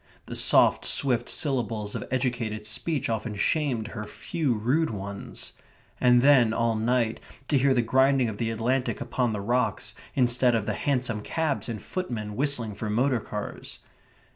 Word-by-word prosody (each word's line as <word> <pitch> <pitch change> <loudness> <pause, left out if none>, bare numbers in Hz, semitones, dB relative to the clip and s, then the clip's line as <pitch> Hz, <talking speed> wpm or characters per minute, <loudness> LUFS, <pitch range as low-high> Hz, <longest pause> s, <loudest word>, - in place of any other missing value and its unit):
The - - -6
soft, - - +5
swift 125 -4 +1
syllables 115 -8 -1
of - - -4
educated 120 -4 -2
speech 135 +7 -1
often 110 -1 -3
shamed 120 -1 0
her 105 -1 -6
few 135 +4 -2
rude 130 +10 +1
ones. 100 -1 -7 0.5
And 125 -1 +5
then 130 -6 +5
all 115 0 +1
night 115 0 0 0.3
to 145 - +3
hear 135 0 +3
the 120 - +2
grinding 130 +1 +3
of 110 -2 -5
the 115 +1 -1
Atlantic 120 +4 -1
upon 125 -3 -1
the 105 -2 -3
rocks 120 +4 -1 0.2
instead 125 -1 +3
of 110 -2 -1
hansom 125 -6 -1
cabs 155 +2 -2
and 110 -2 -4
footmen 110 - -5
whistling 125 -5 -1
for 105 +1 -5
motor 125 +4 +1
cars.... 105 -1 -7
120 Hz, 155 wpm, -26 LUFS, 110-130 Hz, 0.5 s, soft